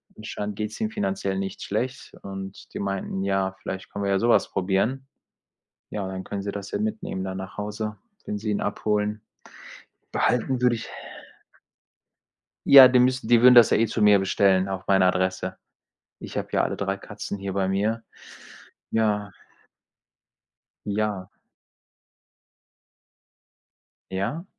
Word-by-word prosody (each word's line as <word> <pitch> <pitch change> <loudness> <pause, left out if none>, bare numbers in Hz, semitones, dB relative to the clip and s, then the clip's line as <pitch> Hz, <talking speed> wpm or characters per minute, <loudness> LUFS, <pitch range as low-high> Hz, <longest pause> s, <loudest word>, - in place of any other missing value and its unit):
Anscheinend 105 -1 -5
geht's 105 0 -5
ihm 220 -1 0
finanziell 195 - -2
nicht 95 0 -4
schlecht 125 +6 -3
und 95 0 -8
die - - -5
meinten: 95 -1 -3
„Ja, 95 -1 0
vielleicht 95 0 -6
können 100 0 -3
wir 100 - +1
ja 95 - +2
sowas 120 +1 +3
probieren.“ 100 +8 0 0.9
Ja, 105 - -3
und 95 - -4
dann 95 0 -6
können 100 -1 -4
sie 100 - -3
das 100 -1 -7
ja - - -1
mitnehmen, 215 - -3
dann 95 0 -4
nach 95 0 -8
Hause, 105 +1 -4 0.3
wenn 105 - -3
sie 105 0 -3
ihn 105 - 0
abholen. 105 +1 -1 0.9
Behalten 125 +1 +1
würde 125 -1 +3
ich 110 - -4 1.9
Ja, 135 -2 +11
die 125 -1 +4
müssten 125 -2 +2
die 120 -1 +5
würden 125 0 +8
das 120 -3 +8
ja - - +4
eh 115 +1 +2
zu 110 - -3
mir 105 -1 +6
bestellen, 95 0 +2
auch 95 -1 -5
meine 95 -1 +4
Adresse. 95 0 -1 0.6
Ich - - -7
habe - - -3
ja - - +2
alle - - -2
3 100 0 -2
Katzen 100 0 -7
hier 100 -1 -4
bei 95 -1 0
mir. 110 +4 0 0.9
Ja. 105 -3 0 1.5
Ja. 105 -2 -2 2.8
Ja? 100 - -3
105 Hz, 145 wpm, -25 LUFS, 95-115 Hz, 2.8 s, Ja